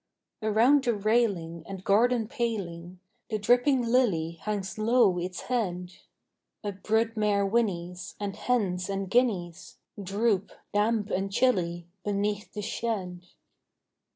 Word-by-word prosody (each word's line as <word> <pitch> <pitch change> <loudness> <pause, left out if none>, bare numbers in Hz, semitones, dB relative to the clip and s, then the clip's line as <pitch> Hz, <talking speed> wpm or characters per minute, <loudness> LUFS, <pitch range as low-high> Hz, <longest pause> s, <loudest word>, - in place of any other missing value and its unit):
Around 230 +6 +4
the 240 -2 +2
railing 200 -7 0
and 195 -1 -7
garden 225 +3 +3
paling 190 -9 -4 0.3
The 215 - 0
dripping 245 +5 +3
lily 230 -10 +2
hangs 205 -2 -3
low 215 -5 +4
its 180 +1 -4
head: 180 -7 -2 0.7
A 205 - -2
brood 220 +4 0
mare 205 -2 +2
whinnies; 180 -5 -1
and 200 -1 -3
hens 195 -7 0
and 195 -1 -3
guineas 195 -9 0 0.2
Droop, 200 +1 0 0.2
damp 210 0 +1
and 195 +1 -1
chilly, 175 -8 +1 0.2
beneath 205 +1 -1
the 210 - -5
shed. 185 -6 -3
205 Hz, 120 wpm, -28 LUFS, 180-230 Hz, 0.7 s, Around